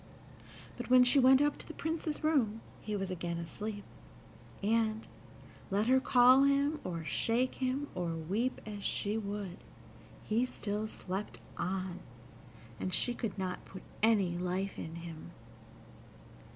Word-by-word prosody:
But -, -, -6 dB
when 255 Hz, 0 st, +8 dB
she 250 Hz, +3 st, +4 dB
went 265 Hz, +2 st, +7 dB
up 295 Hz, 0 st, 0 dB
to -, -, -7 dB
the 320 Hz, -, -8 dB
Prince's 320 Hz, -1 st, -3 dB
room 240 Hz, -9 st, +2 dB, 0.2 s
he 210 Hz, -, -3 dB
was 195 Hz, -2 st, -2 dB
again 170 Hz, -1 st, -3 dB
asleep, 205 Hz, +5 st, -5 dB, 0.8 s
and, 220 Hz, +1 st, +1 dB, 0.6 s
let 200 Hz, +2 st, +1 dB
her 260 Hz, +2 st, +5 dB
call 255 Hz, 0 st, +6 dB
him, 280 Hz, +2 st, +3 dB
or 170 Hz, -2 st, -4 dB
shake 235 Hz, +9 st, +1 dB
him, 265 Hz, +2 st, -1 dB
or 175 Hz, -2 st, -2 dB
weep 200 Hz, +11 st, -1 dB
as 205 Hz, -2 st, -6 dB
she 205 Hz, +2 st, -1 dB
would, 200 Hz, -4 st, -4 dB, 0.7 s
he 225 Hz, +3 st, +1 dB
still 210 Hz, -3 st, -2 dB
slept 195 Hz, -1 st, -5 dB, 0.2 s
on, 185 Hz, -1 st, -3 dB, 0.8 s
and 185 Hz, -, -2 dB
she 245 Hz, -, +2 dB
could 225 Hz, -5 st, -4 dB
not 185 Hz, -1 st, -3 dB
put 190 Hz, -, -11 dB, 0.2 s
any 210 Hz, -5 st, +4 dB
life 180 Hz, +3 st, -2 dB
in 160 Hz, +1 st, -6 dB
him. 165 Hz, -2 st, -8 dB
210 Hz, 140 wpm, -33 LUFS, 185-255 Hz, 0.8 s, when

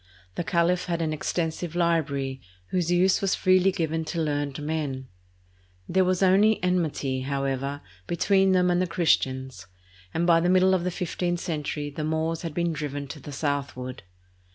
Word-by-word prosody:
The 175 Hz, -, -3 dB
caliph 175 Hz, +1 st, +1 dB
had 170 Hz, -1 st, -2 dB
an 155 Hz, -1 st, -1 dB
extensive 165 Hz, +2 st, -2 dB
library, 140 Hz, -6 st, 0 dB, 0.3 s
whose 175 Hz, -2 st, 0 dB
use 180 Hz, +2 st, +3 dB
was 195 Hz, -1 st, +1 dB
freely 185 Hz, +1 st, +4 dB
given 160 Hz, -3 st, -1 dB
to 170 Hz, -, -3 dB
learned 145 Hz, -3 st, -1 dB
men. 145 Hz, -4 st, -3 dB, 0.8 s
There 190 Hz, +1 st, +3 dB
was 185 Hz, +1 st, +1 dB
only 200 Hz, +4 st, +5 dB
enmity, 160 Hz, -7 st, 0 dB
however, 140 Hz, +1 st, -2 dB, 0.3 s
between 190 Hz, +2 st, +3 dB
them 180 Hz, -1 st, +3 dB
and 175 Hz, +1 st, +2 dB
the 185 Hz, -, 0 dB
Christians, 130 Hz, -, 0 dB, 0.4 s
and 165 Hz, +8 st, 0 dB
by 170 Hz, -1 st, +5 dB
the 175 Hz, +1 st, +1 dB
middle 185 Hz, +1 st, +5 dB
of 185 Hz, -2 st, +1 dB
the 180 Hz, -, 0 dB
fifteenth 175 Hz, -1 st, -2 dB
century 150 Hz, -2 st, -3 dB
the 155 Hz, +2 st, -5 dB
Moors 160 Hz, +1 st, -1 dB
had 165 Hz, -3 st, -5 dB
been 170 Hz, -1 st, 0 dB
driven 145 Hz, -2 st, -4 dB
to 155 Hz, -, -7 dB
the 145 Hz, -, -9 dB
southward. 140 Hz, -3 st, -3 dB
165 Hz, 165 wpm, -26 LUFS, 145-180 Hz, 0.8 s, only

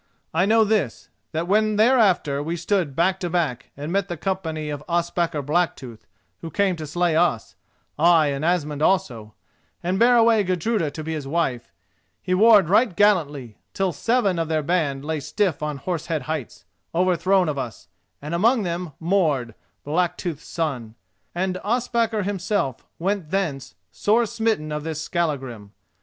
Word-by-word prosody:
I 175 Hz, +4 st, +2 dB
know 225 Hz, +1 st, +5 dB
this, 205 Hz, -, -1 dB, 0.2 s
that 165 Hz, +2 st, -2 dB
when 215 Hz, +2 st, +2 dB
thereafter 205 Hz, -, +3 dB
we 165 Hz, +3 st, -3 dB
stood 170 Hz, -5 st, -1 dB
back 185 Hz, +4 st, +2 dB
to 175 Hz, -, -3 dB
back 155 Hz, -7 st, -1 dB
and 145 Hz, +3 st, -5 dB
met 200 Hz, 0 st, 0 dB
the 175 Hz, -3 st, -5 dB
company 160 Hz, -4 st, -3 dB
of 145 Hz, 0 st, -6 dB
Ospakar 170 Hz, -3 st, 0 dB
Blacktooth, 140 Hz, -7 st, -2 dB, 0.3 s
who 165 Hz, -, -7 dB
came 195 Hz, +3 st, +1 dB
to 155 Hz, -1 st, -6 dB
slay 175 Hz, +2 st, 0 dB
us—ay, 165 Hz, +1 st, +1 dB
and 140 Hz, +2 st, -4 dB
Asmund 150 Hz, -4 st, 0 dB
also, 125 Hz, -, 0 dB, 0.5 s
and 185 Hz, +2 st, 0 dB
bear 245 Hz, +1 st, +5 dB
away 225 Hz, -2 st, +4 dB
Gudruda 185 Hz, -1 st, 0 dB
to 155 Hz, +2 st, -7 dB
be 160 Hz, +1 st, -4 dB
his 150 Hz, -3 st, -5 dB
wife—he 125 Hz, -, -4 dB
warred 205 Hz, -1 st, +6 dB
right 205 Hz, +1 st, +3 dB
gallantly, 150 Hz, -, +1 dB, 0.2 s
till 195 Hz, -1 st, +1 dB
seven 210 Hz, -, +1 dB
of 165 Hz, -, -1 dB
their 155 Hz, -1 st, 0 dB
band 145 Hz, -5 st, -1 dB
lay 160 Hz, 0 st, -2 dB
stiff 155 Hz, +3 st, -1 dB
on 150 Hz, -1 st, -3 dB
Horse 165 Hz, +3 st, -4 dB
Head 160 Hz, -5 st, -2 dB
Heights, 150 Hz, -4 st, -5 dB, 0.3 s
overthrown 185 Hz, +1 st, +2 dB
of 145 Hz, -2 st, -2 dB
us, 110 Hz, -9 st, -7 dB, 0.4 s
and 150 Hz, +3 st, -5 dB
among 225 Hz, +6 st, +3 dB
them 175 Hz, -2 st, -4 dB
Mord, 160 Hz, -, +1 dB, 0.3 s
Blacktooth's 170 Hz, 0 st, -2 dB
son; 130 Hz, -9 st, -3 dB, 0.4 s
and 185 Hz, +1 st, -1 dB
Ospakar 230 Hz, -1 st, 0 dB
himself 190 Hz, -, -2 dB
went 190 Hz, -2 st, -2 dB
thence 150 Hz, -, -2 dB, 0.2 s
sore 215 Hz, -, +2 dB
smitten 220 Hz, -8 st, -1 dB
of 150 Hz, 0 st, -3 dB
this 160 Hz, -1 st, -4 dB
Skallagrim. 135 Hz, -, -3 dB
170 Hz, 155 wpm, -23 LUFS, 150-195 Hz, 0.5 s, warred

